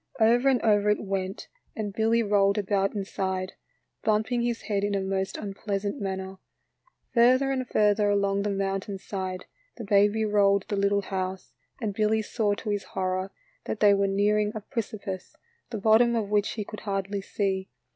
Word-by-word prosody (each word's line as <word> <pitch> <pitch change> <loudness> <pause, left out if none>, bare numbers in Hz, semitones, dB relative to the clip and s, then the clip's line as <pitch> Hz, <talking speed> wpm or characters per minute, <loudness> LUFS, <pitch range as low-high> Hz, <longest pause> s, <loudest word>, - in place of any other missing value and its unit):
Over 240 +4 +4
and 260 -2 +3
over 210 -2 +3
it 210 - +1
went; 195 -1 -3 0.3
and 210 -2 -4
Billy 225 +2 +2
rolled 200 -1 +3
about 200 0 0
inside, 190 -2 -3 0.5
bumping 220 +3 +1
his 235 -1 -2
head 200 -2 -1
in 205 0 0
a - - +1
most 190 0 -2
unpleasant 200 0 -3
manner. 190 -1 -4 0.7
Further 255 +3 +4
and 260 -2 -2
further 210 -1 +3
along 200 -1 +1
the 205 - -1
mountainside 195 -1 -3 0.3
the 235 - -6
baby 205 +1 +3
rolled 200 -2 +3
the 205 - 0
little 200 0 +1
house, 185 -1 -4 0.3
and 215 -5 -2
Billy 215 +1 +1
saw 210 -1 0
to 210 - -4
his 205 -1 -1
horror 185 0 -1 0.3
that 215 - -3
they 205 -1 +6
were 200 0 +2
nearing 210 +2 +2
a 215 - -4
precipice, 205 -5 -5 0.3
the 230 - -4
bottom 225 +3 +4
of 215 -3 -1
which 205 0 +1
he 215 - -3
could 215 - -8
hardly 195 0 -3
see. 195 -1 -2
205 Hz, 165 wpm, -27 LUFS, 195-215 Hz, 0.7 s, they